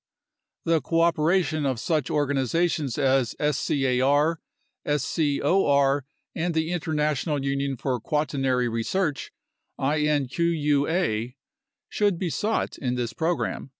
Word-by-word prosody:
The 165 -1 +2
cooperation 165 -1 +1
of 130 -4 -1
such 155 -1 -1
organizations 145 0 0
as 135 -3 +2 0.2
scar, 140 +5 +1 0.4
scor, 145 0 +2 0.4
and 170 +1 -1
the 160 +1 0
International 150 -3 -1
Union 140 -1 -1
for 125 0 -2
Quaternary 135 -2 0
Research 140 +7 -2 0.5
(inqua) 145 -3 0 0.5
should 205 -4 +1
be 180 0 -2
sought 215 +7 -1
in 125 -2 -1
this 120 -2 -3
program. 165 -2 -2
145 Hz, 95 wpm, -25 LUFS, 135-165 Hz, 0.5 s, The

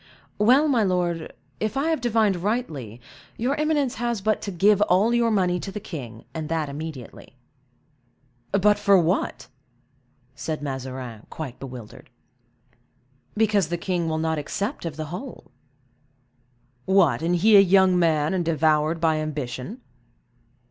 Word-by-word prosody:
"Well, 255 +8 +5
my 255 -6 +2
lord, 175 -4 -1 0.3
if 215 +4 -2
I 290 +4 +1
have 320 - -1
divined 220 -5 +2
rightly, 165 - -3 0.4
your 250 +4 0
eminence 300 -4 +1
has 235 -2 -1
but 215 +2 0
to - - -4
give 200 +3 +3
all 210 +3 +3
your 235 -1 +3
money 180 -4 +1
to 195 - -6
the 210 - -5
king, 120 - -8
and 155 -2 -5
that 160 -3 -1
immediately." 140 -4 -8 1.2
"But 205 +1 +3
for 200 -1 +5
what?" 175 +1 0 0.9
said 150 +2 -5
Mazarin, 130 -4 -6
quite 135 -6 -7
bewildered. 125 -5 -10 1.3
"Because 210 -5 +2
the 175 +2 -2
king 170 -2 -2
will 160 - -1
not 160 -1 -1
accept 200 - -4
of 165 -3 -4
the 155 0 -5
whole." 245 - -8 1.3
"What, 175 -10 +3
and 170 +2 +1
he 210 +5 +5
a - - +10
young 190 -1 +4
man, 155 -1 +2
and 185 -2 0
devoured 155 0 +1
by 160 -1 +2
ambition?" 150 - -5
175 Hz, 140 wpm, -24 LUFS, 155-210 Hz, 1.3 s, a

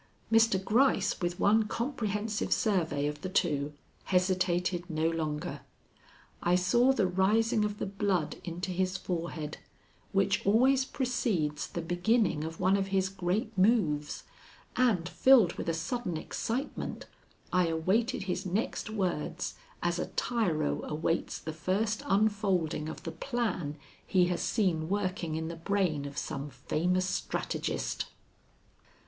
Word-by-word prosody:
Mr. 225 -2 +5
Gryce, 225 -5 +3
with 175 0 -2
one 215 +1 +4
comprehensive 215 -4 -2
survey 175 - +1
of 150 0 -3
the 185 - -4
two, 150 -6 +1 0.3
hesitated 180 -1 +1
no 160 0 +1
longer. 155 -2 -2 0.8
I 175 +1 +3
saw 240 +9 +4
the 235 -7 +2
rising 210 +4 +2
of 210 0 -2
the - - -2
blood 195 -5 -1
into 180 +2 -4
his 185 +1 0
forehead, 165 -4 -4 0.5
which 195 +1 +2
always 260 +6 +4
precedes 215 - -1
the 170 - -5
beginning 175 0 +1
of 160 +1 -6
one 185 +2 +3
of 195 -1 -1
his 190 -1 +1
great 195 +4 -2
moves, 185 -8 +2 0.5
and, 220 -9 +2
filled 225 -1 +5
with - - -4
a - - +3
sudden 180 +1 -2
excitement, 240 - -4 0.5
I 180 -1 +4
awaited 190 +10 +1
his 185 -1 -2
next 200 +4 -2
words 175 -5 -2 0.3
as 175 0 +1
a - - -2
tyro 175 -11 0
awaits 160 +2 -1
the 160 - -6
first 200 +7 0
unfolding 195 -7 +1
of - - -8
the - - -4
plan 215 - -2 0.3
he 185 -2 +3
has - - -3
seen 175 -8 +1
working 185 -5 -1
in 160 0 -2
the 170 - -5
brain 170 -5 0
of 140 +1 -7
some 140 0 -3
famous 180 +6 0
strategist. 185 - -2
185 Hz, 135 wpm, -30 LUFS, 165-210 Hz, 0.8 s, Mr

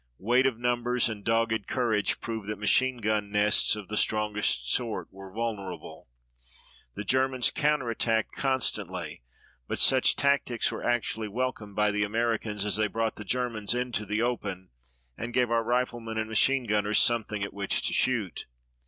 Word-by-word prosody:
Weight 125 +6 +3
of 125 -4 -2
numbers 120 0 +1
and 105 -3 -6
dogged 115 -1 0
courage 115 -5 0
proved 110 -3 -5
that 105 -1 -3
machine 130 +5 +2
gun 105 -2 -1
nests 105 +1 +3
of 105 -3 -8
the 105 - -4
strongest 105 - +1
sort 115 -3 -1
were 95 0 -11
vulnerable. 105 - -5 0.9
The - - -4
Germans 130 +2 +2
counter 150 -4 +1
attacked 115 -1 0
constantly, 105 - -1 0.5
but - - -3
such 130 -1 +4
tactics 140 -4 +1
were - - -6
actually 115 -2 -1
welcomed 110 -2 -4
by 105 0 +2
the 105 0 0
Americans 110 -1 -1
as 105 - 0
they 110 0 +2
brought 115 +1 -2
the 105 - -6
Germans 115 -1 -1
into 120 -4 -2
the 105 +3 0
open 100 - -3 0.5
and 120 +1 -5
gave 125 -2 +2
our 115 -1 +2
riflemen 120 -1 -1
and 110 0 -1
machine 130 +4 +3
gunners 105 -1 +1
something 110 -3 +2
at 100 - -5
which 100 -1 -1
to - - +2
shoot. 115 -8 0
110 Hz, 160 wpm, -28 LUFS, 105-120 Hz, 0.9 s, such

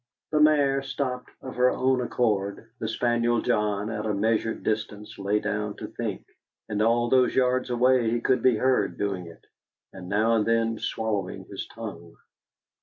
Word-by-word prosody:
The 155 - +2
mare 145 -3 +4
stopped 135 -2 -3
of 130 - -7
her 125 0 +5
own 130 0 +1
accord, 110 -3 -1
the 110 - -3
spaniel 120 +1 +1
John 105 0 0
at 105 -1 -3
a 105 - 0
measured 110 +2 0
distance 105 0 -3
lay 100 +2 +1
down 105 0 -2
to - - -7
think, - - -5 0.4
and 105 -1 -2
all 120 +2 +3
those 125 +1 +3
yards 130 0 +2
away 125 -1 +3
he 120 +1 0
could 125 +1 +1
be 125 -1 +4
heard 125 -5 +1
doing 95 -4 -2
it, 85 - -14 0.5
and 90 -1 -9
now 110 +3 +2
and 105 - +2
then 115 0 +1
swallowing 110 -3 -3
his - - -7
tongue. - - -9
115 Hz, 170 wpm, -26 LUFS, 105-125 Hz, 0.5 s, her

